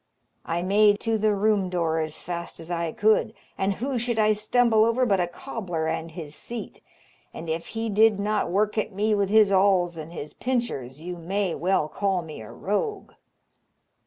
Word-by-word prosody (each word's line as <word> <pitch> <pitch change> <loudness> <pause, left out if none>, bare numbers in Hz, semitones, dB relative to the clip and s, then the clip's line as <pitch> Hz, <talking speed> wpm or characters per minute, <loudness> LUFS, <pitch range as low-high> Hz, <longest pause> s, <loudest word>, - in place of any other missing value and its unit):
I 170 +1 -1
made 205 +2 +4
to 225 -1 0
the 215 0 +2
room 200 -2 +2
door 165 -3 0
as 155 -1 -3
fast 170 0 -5
as 165 +1 -8
I 170 -1 -1
could, 220 +3 +2 0.2
and 195 +1 0
who 255 +4 -2
should 240 0 -1
I 215 0 +4
stumble 220 +1 +3
over 230 +3 +2
but 200 -5 +2
a 175 - +1
cobler 175 -4 -4
and 160 +1 -2
his 155 -3 -8
seat, 235 +7 -7 0.5
and 165 - -7
if 160 +1 -3
he 225 0 -1
did 215 0 +4
not 210 -2 0
work 210 +4 +1
at 215 - -2
me 210 +3 +1
with 200 -2 +1
his 215 -1 +5
awls 185 -3 +3
and 155 +1 -8
his 150 -3 -7
pinchers, 160 - -3
you 180 0 -5
may 185 +2 -1 0.4
call 195 -3 0
me 155 -7 -9
a 110 - -10
rogue. 385 - -3
200 Hz, 185 wpm, -25 LUFS, 170-215 Hz, 0.5 s, his